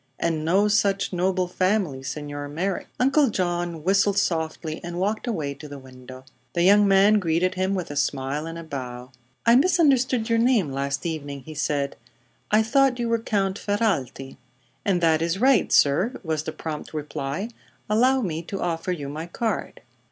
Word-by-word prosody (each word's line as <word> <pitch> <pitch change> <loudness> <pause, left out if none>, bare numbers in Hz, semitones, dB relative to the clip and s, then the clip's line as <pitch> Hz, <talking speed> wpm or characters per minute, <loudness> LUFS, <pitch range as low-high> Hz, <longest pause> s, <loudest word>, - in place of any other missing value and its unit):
"And 165 -2 -1
no 190 +6 +3
such 200 -2 +1
noble 185 +1 0
family, 185 -7 0
Signor 145 +1 -5
Merrick." 180 +6 -3
Uncle 275 +2 +4
John 175 -4 -2
whistled 200 +2 +2
softly 160 -3 -1
and 175 0 -5
walked 210 +6 -1
away 155 -11 -2
to 145 +2 -11
the 145 -1 -8
window. 130 0 -13 0.3
The 170 - +1
young 205 +2 +6
man 200 +2 +5
greeted 180 +1 +1
him 190 +1 -1
with 180 -5 -4
a - - -6
smile 140 +2 -1
and 165 0 -6
a 165 - -7
bow. 125 -4 -7 0.3
"I 235 0 +6
misunderstood 260 -7 +3
your 230 0 +2
name 230 - +2
last 140 +2 -3
evening," 145 -4 -4
he 155 +5 -10
said. 145 -2 -1 0.5
"I 215 +1 +4
thought 265 +3 +3
you 235 -1 -2
were 230 0 +2
Count 200 -3 -1
Ferralti." 165 - -2 0.5
"And 185 -3 +1
that 160 -1 +3
is 170 +2 0
right, 260 -4 +3
sir," 175 - +3
was 160 -3 -1
the - - -3
prompt 155 0 -6
reply. 150 +6 -4 0.4
"Allow 255 +5 +3
me 165 -7 -2
to 190 +3 -6
offer 170 +1 -2
you 150 -6 -4
my 155 +4 -6
card." 225 +6 -3
175 Hz, 175 wpm, -24 LUFS, 150-205 Hz, 0.5 s, young